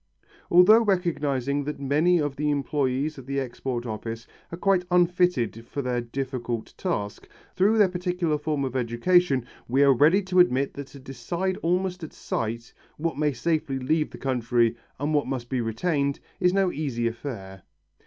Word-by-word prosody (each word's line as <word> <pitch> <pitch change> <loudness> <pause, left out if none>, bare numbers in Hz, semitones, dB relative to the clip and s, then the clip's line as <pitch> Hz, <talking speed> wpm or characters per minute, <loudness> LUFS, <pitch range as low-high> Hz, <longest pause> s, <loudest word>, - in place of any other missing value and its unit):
Although 185 +6 +7
recognizing 145 - 0
that 150 -1 -4
many 150 +6 +3
of 145 -2 -1
the 150 - -3
employés 145 0 -1
of 130 - -12
the 140 0 -1
Export 125 -1 -4
Office 115 0 -5 0.3
are 170 - -5
quite 190 -1 +2
unfitted 175 - +2
for 140 - -4
their 125 -1 -1
difficult 120 -2 -4
task, 105 - -4 0.3
through 205 +4 +3
their 210 -2 +6
particular 180 -4 -1
form 150 -2 -1
of 130 -1 -5
education, 130 +3 +2 0.2
we 135 +4 +3
are 140 -1 +6
ready 155 +10 +4
to 185 -1 +1
admit 140 -6 +3
that 140 -1 -7
to 140 - -13
decide 170 +9 -3
almost 180 +1 -1
at 160 - -7
sight, 115 +1 -4 0.2
what 165 -1 -2
may 150 -1 +2
safely 145 0 -1
leave 150 +4 0
the - - -10
country 120 -3 +1 0.2
and 145 +3 -1
what 145 -3 +1
must 130 -2 -4
be 130 -2 0
retained, 140 +5 -1 0.2
is 180 -1 +3
no 190 -1 +2
easy 135 -6 -2
affair. 110 -6 -6
140 Hz, 165 wpm, -25 LUFS, 125-175 Hz, 0.3 s, Although